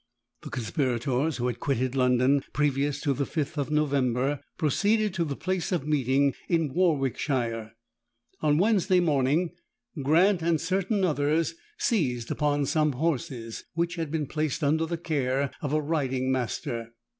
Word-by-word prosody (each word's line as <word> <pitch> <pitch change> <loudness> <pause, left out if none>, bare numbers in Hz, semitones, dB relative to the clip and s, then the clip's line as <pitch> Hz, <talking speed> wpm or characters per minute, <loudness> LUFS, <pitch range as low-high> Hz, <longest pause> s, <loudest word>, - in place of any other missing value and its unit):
The - - -8
conspirators 130 +3 -1
who 120 - -2
had 120 -1 -2
quitted 130 -2 0
London, 130 +1 +3
previous 145 -1 +1
to 140 - +1
the 140 - -1
fifth 155 0 -2
of 145 -2 -2
November, 140 -2 +1 0.2
proceeded 205 +7 +2
to 170 - 0
the 145 -4 -3
place 185 +3 -2
of 170 -6 0
meeting 140 -2 +2 0.2
in 165 -5 +1
Warwickshire. 130 -9 0 0.7
On 150 -1 +2
Wednesday 190 -1 +3
morning 155 +1 +2 0.5
Grant 170 +6 +4
and 165 -1 +2
certain 190 +4 0
others 155 - +1 0.2
seized 125 - 0
upon 145 -1 +1
some 150 +1 +1
horses, 130 -5 -2
which 170 +1 0
had 165 -3 -3
been 155 -1 -1
placed 155 +2 -2
under 160 +3 +2
the 170 +1 -2
care 140 -4 -1
of 145 - -2
a 155 - +2
riding 135 -4 -1
master. 115 -2 -3
145 Hz, 145 wpm, -27 LUFS, 130-165 Hz, 0.7 s, Grant